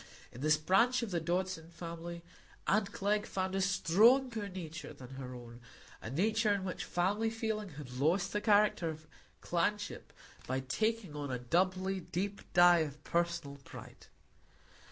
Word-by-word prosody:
In 125 - -10
this 155 +1 +4
branch 230 +11 +3
of 220 - -4
the 175 - +1
Dodson 175 0 -2
family 170 0 -7 0.4
aunt 200 0 +2
Glegg 205 +1 0
found 190 0 -2
a 195 - +1
stronger 215 +5 +3
nature 165 -4 -7
than 130 -2 -11
her 130 -1 -7
own; 120 -1 -11 0.4
a - - -6
nature 215 - +2
in 200 -2 0
which 185 - -4
family 205 +6 +1
feeling 220 -2 -3
had 125 -4 -7
lost 170 +6 +2
the 210 - 0
character 205 -5 +3
of 155 0 -7 0.4
clanship 205 +4 -1 0.4
by 130 +1 -1
taking 215 - -1
on 145 -1 -4
a 125 - -1
doubly 185 +8 +1
deep 195 +3 -3
dye 175 -1 +7
of 150 -2 -3
personal 170 -4 -1
pride. 135 - -12
180 Hz, 155 wpm, -33 LUFS, 155-205 Hz, 0.4 s, dye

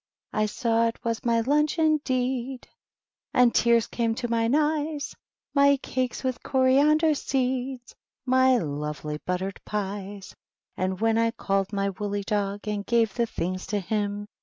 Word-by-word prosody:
I 215 0 +1
saw 230 +1 +1
it 230 - -5
was 230 +1 -1
my 230 -2 +2
lunch, 295 +6 +1
indeed! 265 -5 0 0.7
And 250 -2 +5
tears 235 -1 +4
came 230 -1 -1
to 240 0 -3
mine 230 +2 +1
eyes; 300 -1 0 0.4
My 280 0 +5
calces 255 -1 -3
with 255 -1 -2
coriander 290 +4 +3
seed. 260 -2 -1 0.4
My 260 0 +4
lovely 150 -3 -4
buttered 185 +2 -2
pies! 200 -1 -5 0.4
And 185 0 -2
when 225 0 +2
I 230 0 +3
called 195 -3 -1
my 200 -1 0
woolly 205 +1 -3
dog. 205 0 -2
And 210 -1 -2
gave 230 -2 +2
the 235 -1 0
things 185 -2 -4
to 210 - -1
him. 205 +1 -2
230 Hz, 145 wpm, -26 LUFS, 205-260 Hz, 0.7 s, And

